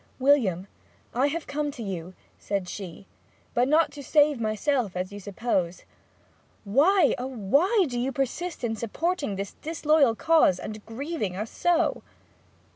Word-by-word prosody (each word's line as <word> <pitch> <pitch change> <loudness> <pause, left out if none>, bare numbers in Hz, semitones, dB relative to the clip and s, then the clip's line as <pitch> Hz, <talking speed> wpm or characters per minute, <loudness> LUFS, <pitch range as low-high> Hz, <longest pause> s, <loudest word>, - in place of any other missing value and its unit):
'William, 250 -10 +3 0.5
I 260 +4 +2
have 315 +3 -3
come 295 +1 -2
to 245 -5 -7
you,' 185 -2 -6 0.2
said 195 -3 -2
she, 190 0 -8 0.5
'but 245 +1 +2
not 305 +1 +3
to 285 0 -9
save 290 -2 +3
myself 215 -1 0
as 185 +2 -3
you 205 - -7
suppose. 190 -3 -2 0.8
Why, 295 - +4
oh, 250 - -3
why 280 - +2
do 245 -2 -3
you 255 +3 -1
persist 275 +6 -3
in 225 -2 -1
supporting 280 - -2
this 195 0 -5
disloyal 305 -5 +2
cause, 310 - +4
and 215 +3 -7
grieving 230 - -3
us 210 +4 -4
so?' 345 -1 +1
250 Hz, 145 wpm, -26 LUFS, 205-300 Hz, 0.8 s, Why